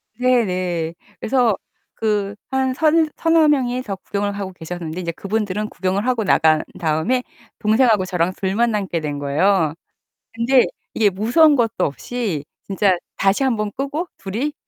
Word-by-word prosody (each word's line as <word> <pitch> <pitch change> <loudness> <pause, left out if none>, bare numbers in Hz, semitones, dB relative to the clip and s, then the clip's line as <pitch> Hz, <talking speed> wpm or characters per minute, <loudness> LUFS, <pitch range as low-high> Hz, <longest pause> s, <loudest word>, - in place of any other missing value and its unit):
네네. 185 -9 0 0.2
그래서 240 -4 +2 0.4
그 205 -2 -1 0.2
한 265 -1 +1
서 305 +3 +3 0.3
서너 325 -1 +4
명이 255 -4 +1
더 200 -5 -4
구경을 200 +1 -3
하고 200 -2 -5
계셨는데 170 0 -6
이제 170 -1 -3
그분들은 210 +2 -2
구경을 190 +4 -1
하고 245 -3 +1
나간 160 -5 +3 0.2
다음에 165 +11 0 0.4
동생하고 215 -2 +3
저랑 180 0 0
둘만 215 +5 +1
남게 195 -5 -1
된 145 -2 -4
거예요. 155 +3 +2 0.6
근데 240 +3 +3 0.3
이게 215 -2 +3
무서운 245 - +4
것도 230 -3 +1
없이 170 - -3 0.2
진짜 195 -1 +2 0.2
다시 195 +7 +2
1 260 -3 +2
번 210 -1 -2
끄고 285 +6 -3
둘이 230 +10 -3
205 Hz, 295 characters per minute, -20 LUFS, 185-245 Hz, 0.6 s, 서너